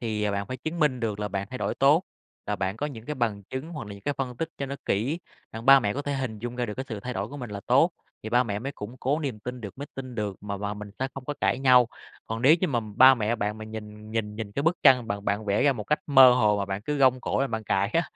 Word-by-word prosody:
thì 105 -3 -1
bạn 100 0 -2
phải 130 +4 -5
chứng 160 +6 -5
minh 140 -5 +2
được 105 -3 -2
là 105 - -2
bạn 100 0 -3
thay 125 - -5
đổi - - -1
tốt, 145 +6 +4 0.4
là 105 0 -1
bạn 95 +2 -2
có 145 - -2
những 120 -5 -9
cái 150 - -3
bằng 110 -6 -1
chứng 130 - -6
hoặc 150 -9 -6
là 100 - -7
những 100 - -14
cái 145 0 -1
phân 125 -2 -3
tích 160 +5 -2
cho 140 - -2
nó 140 +1 -5
kỹ. 130 - 0 0.3
Đặng 115 +1 -7
ba 135 0 +9
mẹ 105 -3 0
có 145 - -3
thể 145 0 -2
hình 130 -5 -3
dung 120 +3 -5
ra 125 - -1
được 105 - -5
cái 130 - -4
sự 110 -3 -5
thay 125 +4 -5
đổi 100 +1 -3
của 145 - -8
mình 125 -5 -7
là 100 -1 -5
tốt - - +5 0.3
thì 110 - -5
ba 125 +2 +4
mẹ 105 -4 -3
mới 135 +6 -5
củng 110 0 -8
cố 135 +4 0
niềm 135 -7 -3
tin 125 +2 -6
được, 100 +1 -8
mới 145 - -5
tin 130 -2 -7
được 105 -4 -3
mà 100 -1 -4
mà 105 +1 -3
mình 105 -1 -8
sẽ 130 - -1
không 135 - -7
có 145 +2 -3
cãi - - +2
nhau. 125 -3 +5 0.4
Còn 115 +2 -4
nếu 150 +5 +7
như 185 - +1
mà 120 -4 0 0.2
ba 130 +2 +9
mẹ 115 -1 0
bạn 105 0 -2
nhìn 105 0 -9
nhìn 110 -2 -2
nhìn 110 -2 -5
cái 140 - -2
bức 165 +2 +2
tranh 125 -4 +6
bạn 100 -1 -3
bạn 105 +2 -1
vẽ 100 +3 +1
ra 145 - +5
một 110 -5 -6
cách 150 - +1
mơ 135 -3 +8
hồ 105 -4 +3
mà 100 - 0
bạn 100 +1 -4
cứ 150 +6 -2
gông 130 -2 +4
cổ - - -1
lên 135 - 0
bạn 110 -1 -3
cãi 100 0 +1
á, 165 - +3
120 Hz, 310 wpm, -26 LUFS, 105-135 Hz, 0.4 s, ba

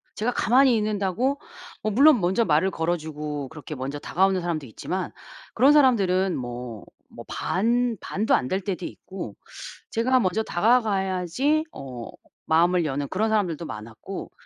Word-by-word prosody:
제가 225 +3 0
가만히 255 +2 +4
있는다고 215 +6 0 0.4
어 215 - +1
물론 275 +4 +6
먼저 190 +6 +2
말을 165 +4 +2
걸어주고 150 -4 -3
그렇게 155 -1 -8
먼저 135 +2 -4
다가오는 190 +4 +1
사람도 165 -5 -2
있지만 180 +11 -4 0.4
그런 270 +5 +6
사람들은 195 -10 +3
뭐 120 -3 -6 0.3
뭐 - - -11
반 235 +3 0
반도 215 +3 +1
안 125 - 0
될 190 +1 0
때도 185 -2 -4
있고 180 - -8 0.6
제가 255 +3 +2
먼저 210 -1 +1
다가가야지 215 - +1
어 125 -4 -7 0.4
마음을 170 +2 +3
여는 140 -1 -2
그런 215 +4 0
사람들도 185 -7 0
많았고 110 - -8
185 Hz, 315 characters per minute, -25 LUFS, 155-225 Hz, 0.6 s, 물론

